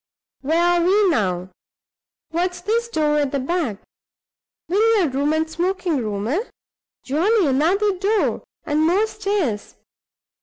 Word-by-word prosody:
Where 315 +5 +1
are 350 0 +3
we 390 +2 +3
now? 185 - -1 0.8
What's 355 +2 -1
this 460 +5 0
door 305 -9 +1
at 285 -2 0
the 280 - 0
back? 275 - -2 0.9
Billiard 405 - +2
room 285 +2 +1
and 315 +1 0
smoking 355 0 -1
room, 210 -2 -3
eh? 295 +10 +1 0.6
Jolly. 365 - +2
Another 355 +9 +2
door! 415 +2 0 0.2
and 300 0 0
more 385 +6 +3
stairs! 395 - -2
335 Hz, 125 wpm, -21 LUFS, 280-395 Hz, 0.9 s, are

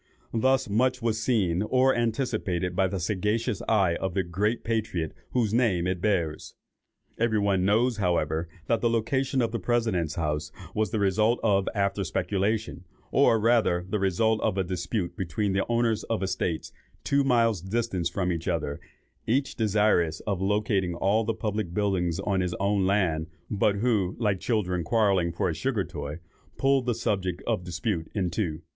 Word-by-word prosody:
Thus 130 +3 +2
much 125 +5 +1
was 110 -1 0
seen 100 -8 +1
or 130 +4 +3
anticipated 110 -7 -1
by 95 0 +3
the 95 +1 -3
sagacious 105 +4 -1
eye 95 -6 +3
of 95 -2 -3
the 95 - +2
great 100 +7 -1
patriot 110 -8 -2 0.2
whose 115 -4 0
name 110 -8 +2
it 90 -1 -1
bears. 85 -7 -1 0.6
Every 115 -1 +2
one 100 -3 +2
knows, 115 +4 +2
however, 85 -4 0 0.2
that 115 - +1
the 120 - +2
location 130 +3 0
of 115 - -1
the 115 - -2
President's 110 -10 0
House 75 -2 -2 0.2
was 110 -1 0
the 110 - -2
result 105 +4 +2
of 100 -3 +2
after 100 0 0
speculation, 100 +2 -1 0.3
or 115 - +4
rather 105 -6 +2
the 105 +2 -1
result 110 +4 +1
of 95 - 0
a 95 - +2
dispute 90 0 -3
between 95 +3 -1
the 95 - 0
owners 115 -2 +1
of 115 -3 -2
estates, 90 -3 -2 0.3
two 140 0 +2
miles 115 -7 +2
distant 95 -3 -1
from 90 +1 -1
each 85 -1 -4
other, 75 -2 -1 0.5
each 135 +4 +1
desirous 105 -7 +2
of 100 -3 -2
locating 100 -3 0
all 100 +5 +2
the 115 - -1
public 105 -5 -3
buildings 95 -4 0
on 100 -1 0
his 90 -1 -2
own 100 -1 +1
land, 85 -5 +1 0.2
but 100 0 +2
who, 100 -4 +1
like 105 -5 0
children 90 -7 0
quarrelling 95 -2 +2
for 85 - -1
a 85 - 0
sugar 110 - -1
toy, 75 -3 -6 0.4
pulled 135 -2 +2
the 120 - +1
subject 95 -4 -2
of 110 -6 -1
dispute 90 -1 -3
in 90 -4 0
two. 85 -4 -2
100 Hz, 170 wpm, -27 LUFS, 90-115 Hz, 0.6 s, or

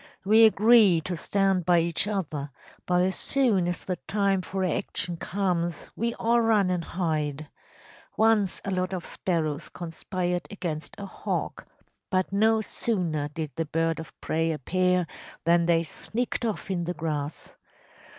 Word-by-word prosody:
We 220 +3 +7
agree 215 -4 +6
to 180 +3 -4
stand 195 +2 +1
by 175 +1 +4
each 170 +4 0
other, 155 -9 -3 0.4
but 180 0 +3
as 190 +1 +1
soon 230 -10 +2
as 175 - -4
the 185 -2 -2
time 195 0 0
for 190 +1 -3
action 175 0 -1
comes 175 -2 -1 0.2
we 235 +1 -1
all 235 +1 +2
run 215 -5 +3
and 175 -2 -1
hide. 155 -4 -2 0.7
Once 220 -4 +3
a 195 - -2
lot 185 0 -1
of 180 - -5
sparrows 155 -4 -2
conspired 175 +1 -3
against 170 -6 -5
a 200 - -6
hawk, - - -4 0.4
but 185 -1 0
no 220 +2 +3
sooner 175 -10 -1
did 155 0 -5
the 165 - 0
bird 165 +1 0
of 160 - -10
prey 165 +1 0
appear 180 +4 +1 0.4
than 170 0 +3
they 165 -1 +3
sneaked 235 +8 -3
off 210 -3 -3
in 175 -2 -1
the 175 +1 -3
grass. 150 -2 -4
180 Hz, 150 wpm, -27 LUFS, 165-200 Hz, 0.7 s, We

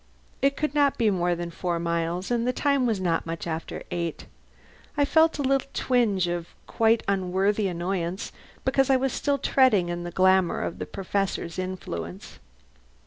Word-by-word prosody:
It 275 +1 +2
could 305 -2 -1
not 285 -2 +3
be 225 -3 +3
more 175 -2 +1
than 170 0 -5
four 175 0 -2
miles, 170 +3 -2
and 240 0 +1
the - - +3
time 280 -1 +1
was 220 -4 0
not 170 -3 0
much 165 0 -4
after 160 -1 -4
eight. 170 -2 -3 0.7
I 285 - +4
felt 320 +2 +4
a 285 - -1
little 275 0 +1
twinge 215 -8 +2
of 175 -1 -3 0.2
quite 225 0 +2
unworthy 195 +2 +1
annoyance 175 0 -3 0.3
because 270 0 +2
I 265 - +5
was 265 0 -1
still 285 -1 0
treading 250 -10 +3
in 175 0 -3
the 175 - -4
glamour 185 0 +3
of - - -4
the - - -4
Professor's 195 -3 -2
influence. 95 - -6
190 Hz, 170 wpm, -26 LUFS, 175-255 Hz, 0.7 s, I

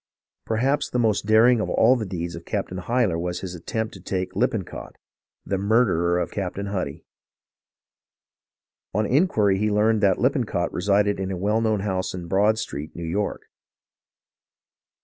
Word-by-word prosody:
Perhaps 130 +6 +1
the - - -2
most 110 -4 +1
daring 115 +3 +5
of - - -2
all 120 +3 +4
the 110 -5 -3
deeds 85 -2 -4
of 85 - -8
Captain 90 +2 -3
Hyler 110 -4 0
was 90 +1 -3
his 95 -2 -5
attempt 110 +6 -4
to 95 - -11
take 95 0 -3
Lippencott, - - -2 0.5
the 95 - -1
murderer 95 -5 +2
of 90 - -2
Cap 95 -3 -3
tain 100 - -4
Huddy. 100 -2 -4 1.9
"On 110 - +2
inquiry 105 - +2
he 105 +1 +1
learned 105 +1 +2
that 95 -2 +3
Lippencott 125 - 0
resided 100 +2 +1
in 95 -1 -2
a 95 - -3
well 105 +5 +1
known 110 -3 +1
house 95 -2 -2
in 90 -1 -6
Broad 105 +4 +3
Street, 75 -9 -5
New 85 - -5
York. 100 +5 -2
100 Hz, 160 wpm, -24 LUFS, 90-110 Hz, 1.9 s, daring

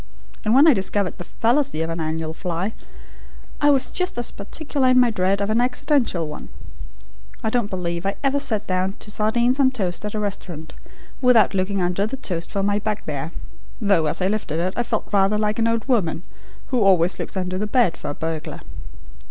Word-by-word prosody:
And 220 +2 +3
when 285 +4 +7
I 310 - +8
discovered 195 -2 -1
the - - -5
fallacy 235 - 0
of 165 0 -3
the 165 - -3
annual 160 0 -3
fly, 180 +5 -3 0.9
I 290 - +5
was 275 -2 +3
just 365 -5 0
as 240 - -1
particular 275 +6 -2
in 255 0 +5
my 245 -2 +4
dread 195 -1 +1
of 200 +1 0
an 225 +2 +3
accidental 250 - +1
one. 150 - -8 0.9
I 220 - 0
don't 235 -4 0
believe 170 -3 -3
I 195 +1 -1
ever 275 +1 +2
sat 225 -7 -1
down 185 +1 0
to 210 - -10
sardines 235 +5 +2
on 265 -2 +5
toast 195 -9 -2
at 210 +1 -4
a - - -1
restaurant 180 -6 -5 0.5
without 245 -6 +5
looking 190 0 0
under 180 +4 0
the 270 - -5
toast 175 -9 -3
for 200 -1 -2
my 205 +1 +1
bugbear, 165 -9 -3 0.5
though 195 -8 +2
as 150 - -1
I - - +3
lifted 200 -7 -2
it 185 +2 -1
I - - +1
felt 235 -2 -2
rather 200 +1 +3
like 210 0 0
the 230 0 +2
old 230 +2 -1
woman 185 - +1 0.5
who 250 -3 +1
always 185 -3 +4
looks - - -4
under 185 0 -2
the 210 - -1
bed 215 -6 +2
for - - -6
a 145 - -4
burglar. 160 -1 -4
205 Hz, 200 wpm, -22 LUFS, 180-240 Hz, 0.9 s, I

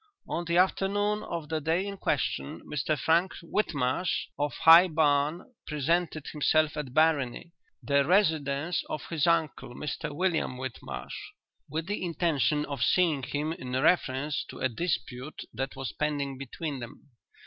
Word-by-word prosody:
"'On 175 - -2
the 170 +1 +1
afternoon 205 +3 +2
of 170 -7 -5
the 160 -1 -1
day 165 +5 +1
in 200 0 -5
question, 150 -3 -2
Mr 150 +1 -2
Frank 170 +6 +2
Whitmarsh, 165 -4 -1
of 145 -2 0
High 165 +6 +8
Barn, 155 - +1
presented 155 +1 0
himself 155 +1 +2
at 150 -4 -4
Barony, 155 0 +1 0.3
the 140 0 +3
residence 160 -3 +1
of 155 - -4
his 160 -1 +1
uncle, 160 -7 0
Mr 150 +1 -4
William 160 -5 0
Whitmarsh, 130 -2 -6 0.6
with 160 +3 -3
the 205 +1 -3
intention 150 -5 +1
of 140 -4 -5
seeing 165 -4 +3
him 150 +4 -2
in 125 -5 -7
reference 140 0 +1
to - - -10
a 130 - 0
dispute 135 -1 -3
that 135 +1 -4
was 135 -5 -4
pending 140 -3 -2
between 140 +2 -5
them. 125 +4 -11
155 Hz, 145 wpm, -28 LUFS, 140-170 Hz, 0.6 s, High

